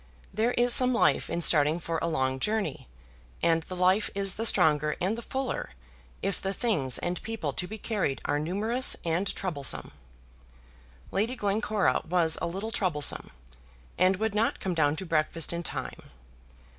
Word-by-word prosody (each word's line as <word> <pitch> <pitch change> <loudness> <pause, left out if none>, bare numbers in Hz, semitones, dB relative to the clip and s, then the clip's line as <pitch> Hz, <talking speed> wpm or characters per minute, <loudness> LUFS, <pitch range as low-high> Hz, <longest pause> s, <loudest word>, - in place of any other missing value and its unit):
There 225 +4 +1
is 240 0 +3
some 255 -1 +4
life - - +2
in 170 - -1
starting 155 +1 +4
for 165 -1 -3
a - - 0
long 130 -5 0
journey, 210 - -2 0.6
and 165 -1 +3
the 185 +3 -7
life 185 +3 +3
is 195 -1 +1
the 225 +1 +1
stronger 150 -4 +3
and 190 +5 0
the 235 - -6
fuller 265 +2 -3 0.5
if 195 - -1
the 195 0 -2
things 155 - +1
and 175 +1 -3
people 220 -11 -3
to 180 - -2
be 220 - -6
carried 200 -11 -1
are 145 - +1
numerous 215 +11 0
and 170 +4 0
troublesome. 155 -8 -1 1.2
Lady 225 +6 0
Glencora 210 -1 +1
was 165 -2 +3
a - - 0
little 195 +6 -4
troublesome, 170 -9 +1 0.7
and 185 +1 +3
would 220 +2 -1
not 215 +2 +1
come 185 - -2
down 150 -3 +2
to 190 - -5
breakfast 165 0 0
in 170 - -2
time. 175 - -6
185 Hz, 165 wpm, -28 LUFS, 160-220 Hz, 1.2 s, some